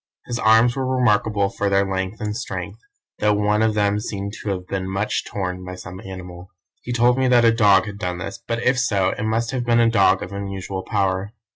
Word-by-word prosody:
His 120 Hz, -1 st, -4 dB
arms 115 Hz, +2 st, +4 dB
were 135 Hz, -, -2 dB
remarkable 105 Hz, -4 st, +2 dB
for 100 Hz, 0 st, -2 dB
their 100 Hz, 0 st, +3 dB
length 95 Hz, +2 st, -3 dB
and 105 Hz, -1 st, -3 dB
strength, 120 Hz, -, -5 dB, 0.4 s
though 105 Hz, 0 st, +3 dB
one 105 Hz, +1 st, +1 dB
of 110 Hz, -1 st, +2 dB
them 105 Hz, 0 st, +1 dB
seemed 100 Hz, -2 st, -5 dB
to 105 Hz, -, -4 dB
have 90 Hz, -2 st, -3 dB
been 95 Hz, 0 st, -4 dB
much 95 Hz, +3 st, -1 dB
torn 90 Hz, -2 st, -4 dB
by 90 Hz, 0 st, -7 dB
some 90 Hz, 0 st, -9 dB
animal. 90 Hz, -1 st, -9 dB, 0.3 s
He 125 Hz, -, -6 dB
told 120 Hz, +1 st, +3 dB
me 130 Hz, -, +2 dB
that 120 Hz, -2 st, +5 dB
a 115 Hz, -, +6 dB
dog 100 Hz, -4 st, +4 dB
had 100 Hz, -1 st, -7 dB
done 90 Hz, -3 st, -3 dB
this, 95 Hz, -, -6 dB
but 115 Hz, 0 st, -2 dB
if 125 Hz, 0 st, +2 dB
so 100 Hz, -7 st, +1 dB
it -, -, -4 dB
must 115 Hz, +2 st, 0 dB
have 130 Hz, -2 st, -2 dB
been 120 Hz, -1 st, +3 dB
a 115 Hz, -1 st, +4 dB
dog 100 Hz, -4 st, +3 dB
of 90 Hz, -, -8 dB
unusual 100 Hz, -1 st, -5 dB
power. 100 Hz, 0 st, -1 dB
105 Hz, 225 wpm, -22 LUFS, 95-115 Hz, 0.4 s, a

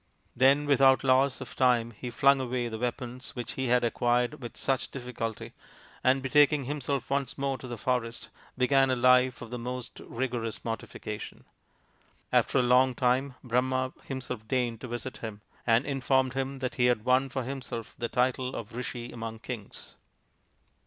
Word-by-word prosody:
Then 135 Hz, +3 st, +4 dB
without 135 Hz, -2 st, +5 dB
loss 130 Hz, 0 st, +3 dB
of -, -, -8 dB
time 120 Hz, -3 st, +3 dB
he 120 Hz, +3 st, -7 dB
flung 135 Hz, +3 st, +4 dB
away 125 Hz, -1 st, -1 dB
the 110 Hz, -1 st, -5 dB
weapons 125 Hz, +1 st, -4 dB
which 120 Hz, -2 st, -4 dB
he 130 Hz, -1 st, -2 dB
had 125 Hz, 0 st, +3 dB
acquired 120 Hz, +4 st, +1 dB
with 120 Hz, -2 st, -8 dB
such 135 Hz, -1 st, 0 dB
difficulty, 120 Hz, -4 st, -5 dB, 0.5 s
and, 130 Hz, +1 st, +3 dB
betaking 145 Hz, +1 st, +4 dB
himself 140 Hz, 0 st, -3 dB
once 140 Hz, -2 st, -1 dB
more 135 Hz, -1 st, -1 dB
to 130 Hz, -, -8 dB
the 120 Hz, -1 st, -5 dB
forest, 115 Hz, 0 st, -2 dB, 0.3 s
began 135 Hz, +1 st, +4 dB
a 130 Hz, -, +2 dB
life 125 Hz, 0 st, +4 dB
of 115 Hz, -, -10 dB
the 125 Hz, -, -4 dB
most 125 Hz, +1 st, -6 dB
rigorous 120 Hz, -2 st, -4 dB
mortification. 110 Hz, -2 st, -6 dB, 0.9 s
After -, -, +3 dB
a 125 Hz, -, +4 dB
long 125 Hz, +1 st, +4 dB
time 130 Hz, +1 st, +1 dB
Brahma 130 Hz, +1 st, 0 dB
himself 125 Hz, -5 st, -5 dB
deigned 120 Hz, -2 st, 0 dB
to -, -, -6 dB
visit 120 Hz, +2 st, -5 dB
him, 110 Hz, -2 st, -7 dB, 0.3 s
and 115 Hz, +3 st, +4 dB
informed 130 Hz, -2 st, +1 dB
him 135 Hz, +1 st, -2 dB
that 125 Hz, -, -2 dB
he 125 Hz, -, +6 dB
had 120 Hz, -3 st, +1 dB
won 130 Hz, +1 st, +3 dB
for 130 Hz, 0 st, -3 dB
himself 125 Hz, -3 st, -5 dB
the 120 Hz, -1 st, -3 dB
title 130 Hz, 0 st, 0 dB
of 115 Hz, 0 st, -7 dB
Rishi 120 Hz, -1 st, -5 dB
among 115 Hz, -1 st, -6 dB
Kings. 115 Hz, -2 st, -8 dB
125 Hz, 165 wpm, -29 LUFS, 120-130 Hz, 0.9 s, he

